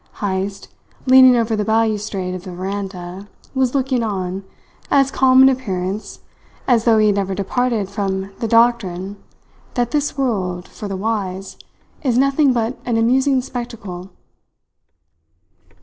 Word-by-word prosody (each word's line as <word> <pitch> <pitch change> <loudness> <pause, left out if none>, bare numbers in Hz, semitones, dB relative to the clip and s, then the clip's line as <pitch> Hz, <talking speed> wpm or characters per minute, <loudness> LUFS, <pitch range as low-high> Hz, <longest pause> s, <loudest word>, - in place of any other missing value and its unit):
Heyst, 195 0 -3 0.4
leaning 260 -1 +7
over 225 -1 +1
the 210 - 0
balustrade 210 -4 0
of 185 -1 -6
the 185 - -8
veranda, 190 0 -6 0.3
was 265 -1 0
looking 265 -2 +1
on, 190 -3 -3 0.5
as 275 -1 +3
calm 260 -1 +5
in 265 - +8
appearance 200 -6 -3 0.5
as 235 -3 +3
though 230 -2 +5
he 215 - +4
had 210 - +4
never 195 -1 -1
departed 225 +1 -1
from 195 -1 -3
the 230 - -1
doctrine 205 -5 +2 0.6
that 240 -1 0
this 295 -1 -1
world, 185 -9 -1
for 210 - -8
the 195 -1 -4
wise, 195 -2 -3 0.5
is 250 -4 +1
nothing 275 +1 +3
but 235 0 -1
an 235 -2 0
amusing 260 +3 +2
spectacle. 220 -8 -7
220 Hz, 135 wpm, -19 LUFS, 195-250 Hz, 0.6 s, in